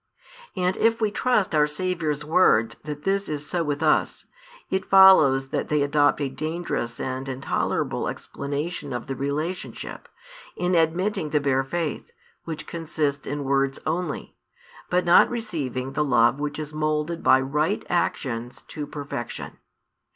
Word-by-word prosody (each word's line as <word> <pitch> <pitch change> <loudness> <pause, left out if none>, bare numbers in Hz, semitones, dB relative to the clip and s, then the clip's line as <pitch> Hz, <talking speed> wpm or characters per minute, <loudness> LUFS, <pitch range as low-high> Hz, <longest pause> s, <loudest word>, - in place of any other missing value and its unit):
And 185 0 0
if 230 0 +2
we 215 -2 +1
trust 215 -4 +1
our 150 -1 +4
Saviour's 155 -2 -2
words 135 -9 +3
that 150 -1 -6
this 195 +1 0
is 150 -1 -3
so 175 +2 -1
with 145 0 -2
us, 155 - +1 0.5
it 190 0 0
follows 155 -9 +7
that - - -2
they 150 -1 +2
adopt 145 0 +3
a 140 - +1
dangerous 155 -5 -3
and 130 +1 -4
intolerable 130 +1 -1
explanation 145 +1 -4
of 120 - -4
the 135 - -4
relationship, 150 +7 -4 0.5
in 180 +1 0
admitting 170 +2 +1
the 150 - +2
bare 135 -2 +1
faith, 165 - -3 0.4
which 160 -2 -5
consists 155 -3 -3
in 145 +1 -3
words 135 0 +1
only, 165 0 -3 0.5
but 180 0 +1
not 175 - +6
receiving 150 - -3
the 150 +2 +1
love 120 -1 +3
which 145 0 -3
is 155 -1 -6
moulded 155 +2 -1
by 130 - +5
right 150 +8 -1
actions 125 -8 -2
to 150 -2 -5
perfection. 145 -1 -6
150 Hz, 145 wpm, -24 LUFS, 140-175 Hz, 0.5 s, follows